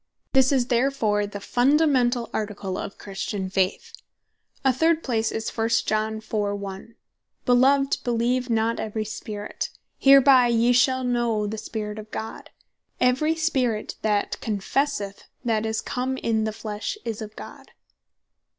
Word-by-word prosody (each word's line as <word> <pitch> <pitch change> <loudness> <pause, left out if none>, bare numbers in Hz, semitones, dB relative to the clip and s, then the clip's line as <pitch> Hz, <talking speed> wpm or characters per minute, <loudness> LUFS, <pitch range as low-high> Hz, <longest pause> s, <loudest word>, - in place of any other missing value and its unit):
This 265 -1 +5
is 260 -3 +2
therefore 235 -5 +1
the 205 - -7
Fundamentall 250 0 +2
Article 205 -3 -3
of 195 - -6
Christian 195 -1 -4
Faith. 190 -1 -1 0.7
A 265 - +5
third 325 +4 +2
place 225 -3 0
is, 225 - -3
1 225 0 0 0.2
Joh. 215 0 0
4.1. 205 0 -4 0.5
"Beloved, 270 +3 +4
beleeve 245 +1 0
not 225 0 +1
every 215 0 -3
spirit. 210 -1 -5 0.3
Hereby 270 -2 +7
yee 235 +1 +3
shall 260 +1 +3
know 240 -4 0
the 215 +1 -4
Spirit 210 -1 -5
of 215 0 -10
God; 220 0 -6 0.5
every 265 +6 +2
spirit 265 -9 0
that 210 -2 0
confesseth 210 0 -2 0.2
that 225 -2 +1
Jesus 220 0 -1
Christ - - -13
is - - -5
come 260 0 -1
in 220 -3 0
the 220 - -1
flesh, 215 - -5
is 225 -2 -4
of 215 0 -8
God." - - -11
230 Hz, 140 wpm, -24 LUFS, 210-255 Hz, 0.7 s, Hereby